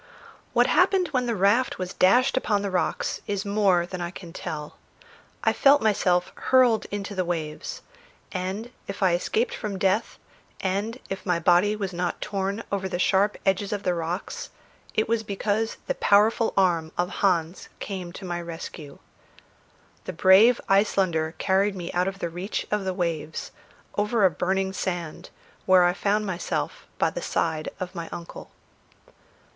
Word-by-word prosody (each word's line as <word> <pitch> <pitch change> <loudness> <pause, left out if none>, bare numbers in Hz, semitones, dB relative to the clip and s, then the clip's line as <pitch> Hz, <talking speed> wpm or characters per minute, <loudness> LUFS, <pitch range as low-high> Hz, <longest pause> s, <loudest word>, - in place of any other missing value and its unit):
What - - +5
happened 370 -4 +3
when 255 -4 0
the 235 - 0
raft 205 +6 +2
was 185 -1 -4
dashed 250 +8 +4
upon 210 -6 +1
the 200 - -2
rocks 180 - -1
is 200 0 -2
more 200 -4 +3
than 180 0 -6
I 175 - -2
can 175 -2 -10
tell. 150 -4 -6 0.7
I - - +3
felt 285 0 +5
myself 180 -5 +2
hurled 250 -4 +3
into 205 0 -4
the 185 -2 0
waves; 170 - -4 0.5
and 190 +5 -4 0.2
if 195 0 -4
I 185 -2 +4
escaped 215 +7 0
from 205 -3 -4
death, 190 +3 0 0.4
and 200 +5 -2
if 195 - -4
my 180 -3 +1
body 180 +5 +3
was 195 -3 -4
not 175 0 -2
torn 200 +2 -2
over 190 -1 -1
the 175 - -2
sharp 195 +3 +2
edges 195 +1 +1
of 205 -1 -3
the 180 - +1
rocks, 170 +2 -4 0.5
it 215 - +2
was 230 0 +1
because 215 +1 -1
the - - 0
powerful 215 +3 +3
arm 170 -4 +2
of 175 0 0
Hans 175 -3 +1
came 185 -3 -5
to 190 - -8
my 175 -1 -3
rescue. 165 -3 -8 1.1
The 185 - -5
brave 195 +8 +6
Icelander 185 -5 +2
carried 195 +1 +2
me 175 -2 -5
out 180 +1 +1
of 195 0 -3
the 170 - -3
reach 180 +5 -4
of 210 -2 0
the 190 - -1
waves, 165 -4 -3 0.4
over 210 0 +2
a 185 - +5
burning 190 +4 -1
sand 175 -4 -4 0.4
where 185 -1 +7
I 175 - +3
found 210 +2 0
myself 185 -3 -3
by - - +2
the - - -5
side 160 - -1
of 185 0 -5
my 170 -3 -6
uncle. 170 - -8
190 Hz, 165 wpm, -25 LUFS, 175-210 Hz, 1.1 s, where